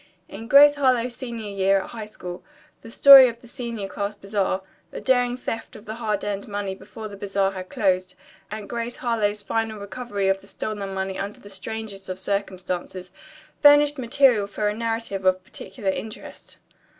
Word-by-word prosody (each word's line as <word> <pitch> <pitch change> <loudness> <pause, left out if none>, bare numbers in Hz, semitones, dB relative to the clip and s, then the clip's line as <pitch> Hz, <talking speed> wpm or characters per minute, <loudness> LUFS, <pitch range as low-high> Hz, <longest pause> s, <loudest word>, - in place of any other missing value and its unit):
In 225 +3 -9
"Grace 285 +3 +8
Harlowe's 250 -3 +2
Senior 235 -5 -6
Year 195 0 +2
at - - -9
High 220 -3 -7
School" 180 -4 -8 0.4
the 230 - -11
story 270 +1 +9
of 235 0 -9
the 240 - -16
senior 235 -4 -5
class 200 +1 -4
bazaar, 195 -2 -2 0.3
the - - -7
daring 245 -1 +2
theft 230 -2 -5
of 215 - -12
their 215 - -5
hard 220 -3 -2
earned 200 -1 -3
money 200 -2 -3
before 205 +3 -9
the 205 - -10
bazaar 195 -1 0
had 185 -1 -8
closed, 185 -2 0 0.3
and 210 -1 -6
Grace 235 0 -4
Harlowe's 210 -4 -1
final 220 +2 -2
recovery 200 0 -4
of 195 0 +1
the 200 - -18
stolen 205 -2 -5
money 190 0 -3
under 200 +1 -5
the 205 - -14
strangest 195 0 -7
of 185 - -4
circumstances, 185 -2 -4 0.5
furnished 290 0 +6
material 245 -4 +3
for 210 +1 -2
a - - -2
narrative 225 -3 -3
of 185 0 +2
particular 190 +1 -4
interest. 215 +2 -9
210 Hz, 175 wpm, -24 LUFS, 195-230 Hz, 0.5 s, story